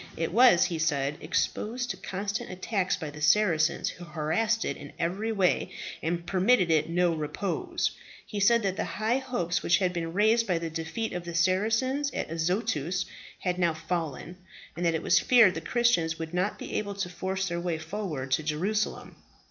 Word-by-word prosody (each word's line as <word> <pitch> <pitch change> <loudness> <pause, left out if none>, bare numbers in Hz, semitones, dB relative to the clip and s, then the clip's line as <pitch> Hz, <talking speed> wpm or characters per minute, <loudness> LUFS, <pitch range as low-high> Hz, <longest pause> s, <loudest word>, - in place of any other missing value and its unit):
It 165 +1 -2
was, 235 -6 +7
he 165 -2 -3
said, 145 -3 0
exposed 240 +9 -1
to - - -5
constant 200 +2 -4
attacks 185 +1 -1
by 160 -5 -6
the 150 +1 -10
Saracens, 160 -1 +3
who 175 - -9
harassed 170 +8 0
it - - -2
in - - -11
every 190 +7 -1
way, 195 -4 +1 0.3
and 170 +1 -2
permitted 185 +1 +3
it 155 0 +2
no 175 0 +2
repose. 195 - -2 0.3
He 210 - -5
said 235 +3 +4
that 190 -1 -1
the - - 0
high 225 +4 0
hopes 240 -11 -1
which 170 - +3
had 185 -2 0
been 165 -1 -3
raised 220 +4 +3
by 180 -3 +1
the 165 -1 -4
defeat 165 +8 -3
of 175 -1 -4
the 170 -1 -6
Saracens 220 - +1
at - - -3
Azotus, 175 0 -1 0.4
had 180 -1 -1
now 170 -3 +2
fallen, 165 0 -4 0.4
and 175 - -4
that 165 - +2
it 160 - -3
was 190 - +4
feared 235 -7 +6
the 160 - -5
Christians 175 -7 +1
would 160 +1 -6
not 185 +4 0
be - - -7
able 205 -1 -5
to 195 -2 -2
force 190 +2 -3
their 170 -1 -2
way 175 -2 -1
forward 160 -6 -5
to 145 - +2
Jerusalem. 185 +8 -2
180 Hz, 190 wpm, -28 LUFS, 165-210 Hz, 0.4 s, was